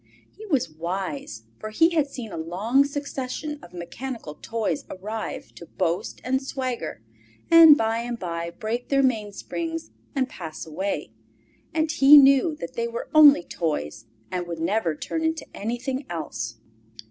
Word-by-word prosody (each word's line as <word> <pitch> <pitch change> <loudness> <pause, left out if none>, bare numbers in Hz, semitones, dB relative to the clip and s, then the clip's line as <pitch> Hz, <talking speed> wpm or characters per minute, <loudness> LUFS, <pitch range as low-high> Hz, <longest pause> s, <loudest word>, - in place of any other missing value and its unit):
He 435 - -10
was 280 -10 +1
wise, 160 - -4 0.2
for 215 - -5
he 325 +10 +4
had 310 -4 +2
seen 245 -6 -7
a - - -6
long 200 +12 +1
succession 285 +1 -4
of 175 - -13
mechanical 180 - -6
toys 215 -2 -2
arrive 215 +4 -6
to 170 - -12
boast 175 -1 -2
and 265 +1 0
swagger, 260 -2 -4 0.5
and 325 -3 +10
by 225 +1 0
and 240 0 -4
by 170 -3 -4
break 225 +6 -4
their 275 -1 +3
mainsprings 260 +8 -2 0.2
and 265 -2 +1
pass 160 -9 -7
away, 190 +6 -3 0.6
and 315 -1 0
he 295 -2 +8
knew 275 +3 +6
that - - -7
they 470 -1 -1
were 470 +1 -6
only 295 - +8
toys, 135 - -3 0.3
and 180 -1 -3
would 170 -1 -5
never 170 -1 0
turn 320 - -3
into 320 -1 -1
anything 255 +5 -3
else. 155 -8 -4
235 Hz, 150 wpm, -25 LUFS, 175-285 Hz, 0.6 s, and